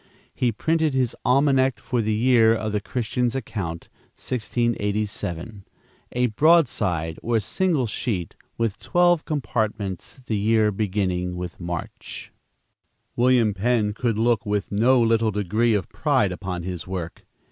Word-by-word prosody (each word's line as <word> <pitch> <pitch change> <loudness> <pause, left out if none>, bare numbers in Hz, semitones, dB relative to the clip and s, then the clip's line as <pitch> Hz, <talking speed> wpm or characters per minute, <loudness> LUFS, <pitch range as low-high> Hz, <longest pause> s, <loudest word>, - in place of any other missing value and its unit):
He 125 -2 +1
printed 160 +4 0
his 130 -3 +1
"Almanac 135 -1 +3
for 125 -2 -1
the 110 0 -1
year 115 -1 +4
of 110 -1 -3
the 105 0 -1
Christian's 120 +2 -1
Account, 95 -10 -4 0.3
1687," 105 -5 -2 0.5
a 125 0 +2
broadside, 105 - +2
or 115 -1 +1
single 155 - 0
sheet, 105 - -3 0.2
with 115 -3 -1
twelve 175 -2 +2
compartments, 110 - -3
the 125 -6 -3
year 110 0 +3
beginning 95 -3 -1
with 90 -1 -6
March. 85 -1 -6 0.8
William 120 -3 +3
Penn 105 +1 +1
could 115 -1 -1
look 115 -1 +2
with 105 -1 -2
no 120 +6 +4
little 115 -1 +3
degree 105 +3 +1
of 100 - -1
pride 130 -11 +1
upon 90 -1 -5
his 90 -1 -5
work. 90 -3 -5
110 Hz, 130 wpm, -24 LUFS, 100-125 Hz, 0.8 s, year